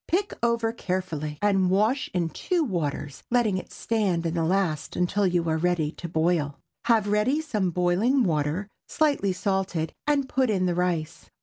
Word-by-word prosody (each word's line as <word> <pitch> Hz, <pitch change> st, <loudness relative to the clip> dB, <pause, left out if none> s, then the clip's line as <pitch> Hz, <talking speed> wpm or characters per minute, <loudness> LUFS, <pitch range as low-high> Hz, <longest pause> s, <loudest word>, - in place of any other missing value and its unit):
Pick 385 Hz, +4 st, 0 dB
over 235 Hz, -1 st, +1 dB
carefully 175 Hz, -8 st, -3 dB
and 195 Hz, -3 st, +3 dB
wash 215 Hz, +8 st, +2 dB
in 175 Hz, -2 st, 0 dB
two 350 Hz, -, -1 dB
waters, 150 Hz, -, -3 dB
letting 230 Hz, -6 st, +2 dB
it -, -, -11 dB
stand 195 Hz, -7 st, 0 dB
in 165 Hz, -, 0 dB
the 165 Hz, -1 st, 0 dB
last 170 Hz, -3 st, 0 dB
until 190 Hz, +3 st, +1 dB
you 175 Hz, -2 st, 0 dB
are 160 Hz, 0 st, +1 dB
ready 170 Hz, -3 st, +1 dB
to 170 Hz, +1 st, -8 dB
boil. 160 Hz, -3 st, +1 dB, 0.3 s
Have 225 Hz, -3 st, +3 dB
ready 210 Hz, +8 st, +2 dB
some 215 Hz, -, -1 dB
boiling 180 Hz, +10 st, +2 dB
water 155 Hz, +3 st, 0 dB, 0.2 s
slightly 285 Hz, -11 st, +1 dB
salted, 190 Hz, -4 st, -1 dB
and 285 Hz, -2 st, +2 dB
put 260 Hz, -2 st, +1 dB
in 190 Hz, -3 st, +1 dB
the 180 Hz, -, +1 dB
rice. 170 Hz, -3 st, -2 dB
185 Hz, 170 wpm, -26 LUFS, 170-225 Hz, 0.3 s, and